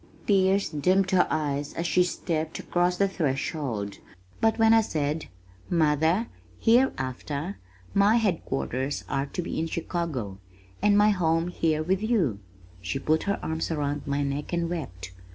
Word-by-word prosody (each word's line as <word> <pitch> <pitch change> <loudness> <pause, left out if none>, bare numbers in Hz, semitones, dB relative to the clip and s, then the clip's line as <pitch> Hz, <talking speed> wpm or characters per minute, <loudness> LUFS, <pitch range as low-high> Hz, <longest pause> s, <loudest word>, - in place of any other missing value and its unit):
Tears 195 0 +3
dimmed 185 +6 +2
her 185 -2 +4
eyes 145 -2 -1
as 170 - -2
she 175 +2 +4
stepped 160 -3 -2
across 180 0 0
the 200 - +3
threshold, 135 - -2 0.4
but 225 -1 +2
when 225 0 +5
I 225 - +6
said, 155 -5 -2 0.4
"Mother, 160 +5 +2 0.3
hereafter 160 - 0 0.3
my 200 +2 +5
headquarters 140 - -1
are 135 0 -1
to 180 - -4
be - - -3
in 165 - -1
Chicago, 155 - -3 0.4
and 205 -1 +4
my 210 +1 +6
home 165 -3 +1
here 160 -3 0
with 185 +4 0
you," 195 - +1 0.4
she 95 +7 -2
put 155 +3 +1
her 200 - 0
arms 160 0 -2
around 145 -3 -2
my 140 0 0
neck 140 +1 -3
and 170 0 0
wept. 95 - -5
160 Hz, 150 wpm, -27 LUFS, 140-190 Hz, 0.4 s, I